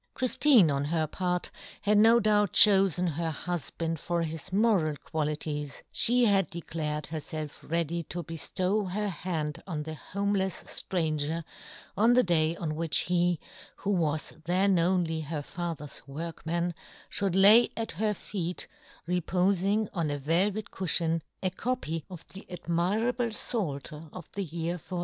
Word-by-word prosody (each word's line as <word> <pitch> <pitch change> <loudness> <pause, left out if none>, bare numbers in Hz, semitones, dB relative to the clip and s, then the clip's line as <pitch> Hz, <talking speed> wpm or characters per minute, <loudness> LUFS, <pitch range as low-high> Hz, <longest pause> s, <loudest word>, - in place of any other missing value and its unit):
Chriftine, 255 - +5
on 140 0 0
her 160 +1 +1
part, 180 +2 -2 0.3
had 205 0 +4
no 225 +2 +7
doubt 210 -3 +2
chofen 190 -4 +5
her 165 +1 -1
hufband 165 0 -3
for 170 +1 -1
his 160 +1 -5
moral 195 -7 +3
qualities; 150 -2 -3
fhe 245 +1 +4
had 195 -5 +3
declared 155 -3 -4
herfelf 155 -2 -6
ready 170 +1 0
to 170 +2 -5
beftow 185 +5 -1
her 205 +2 -1
hand 160 -4 -3
on 155 -5 -3
the 160 +1 -5
homelefs 195 +1 -1
ftranger 160 -2 -1 0.5
on 225 +4 +5
the 250 +1 +5
day 165 -2 +2
on 160 -3 -3
which 160 0 -1
he, 175 -1 +1 0.4
who 200 - -2
was 160 -5 0
then 185 +1 +3
only 170 -2 +1
her 150 -1 -4
father's 165 -3 -5
workman, 165 +3 -3 0.4
ftiould 195 -3 0
lay 215 +5 +8
at 225 -1 -2
her 210 +4 0
feet, 180 -4 -3 0.4
repofing 185 +4 +1
on 170 -5 -1
a 145 - -1
velvet 185 +9 0
cufhion, 165 -2 0 0.2
a 185 - +1
copy 175 - -2
of 180 -3 -10
the 195 - -9
admirable 200 +8 0
Pfalter 160 - -4
of 180 -3 -9
the 200 - -3
year 170 +1 -3
1457. 180 +3 -5
175 Hz, 145 wpm, -29 LUFS, 160-195 Hz, 0.5 s, lay